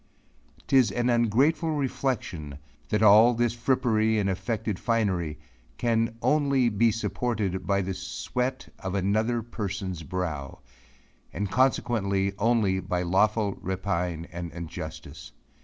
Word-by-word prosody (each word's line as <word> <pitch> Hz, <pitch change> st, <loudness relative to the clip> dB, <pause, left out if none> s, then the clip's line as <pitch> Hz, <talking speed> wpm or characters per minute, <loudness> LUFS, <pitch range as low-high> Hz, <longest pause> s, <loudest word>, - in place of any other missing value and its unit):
Tis 130 Hz, -6 st, +4 dB
an 120 Hz, +3 st, +1 dB
ungrateful 135 Hz, +8 st, +2 dB
reflexion 120 Hz, -, -2 dB, 0.3 s
that 105 Hz, 0 st, +1 dB
all 110 Hz, +3 st, +7 dB
this 120 Hz, 0 st, +1 dB
frippery 115 Hz, -3 st, +1 dB
and 100 Hz, -2 st, +1 dB
effected 110 Hz, +1 st, -3 dB
finery, 95 Hz, -10 st, 0 dB, 0.4 s
can 115 Hz, -1 st, +1 dB
only 140 Hz, -5 st, +3 dB
he 115 Hz, +2 st, +3 dB
supported 105 Hz, -5 st, -2 dB
by 100 Hz, 0 st, +2 dB
the 95 Hz, +1 st, -3 dB
sweat 125 Hz, +7 st, -3 dB
of 95 Hz, 0 st, -4 dB
another 110 Hz, +5 st, +1 dB
person's 100 Hz, -6 st, -4 dB
brow, 80 Hz, -6 st, -4 dB, 0.7 s
and 100 Hz, +2 st, -3 dB
consequently 105 Hz, -6 st, +1 dB
only 105 Hz, -4 st, +2 dB
by 90 Hz, -1 st, -2 dB
lawful 100 Hz, +3 st, +1 dB
rapine 90 Hz, -3 st, -2 dB
and 85 Hz, -1 st, -6 dB
injustice. 80 Hz, -2 st, -8 dB
105 Hz, 115 wpm, -27 LUFS, 95-120 Hz, 0.7 s, all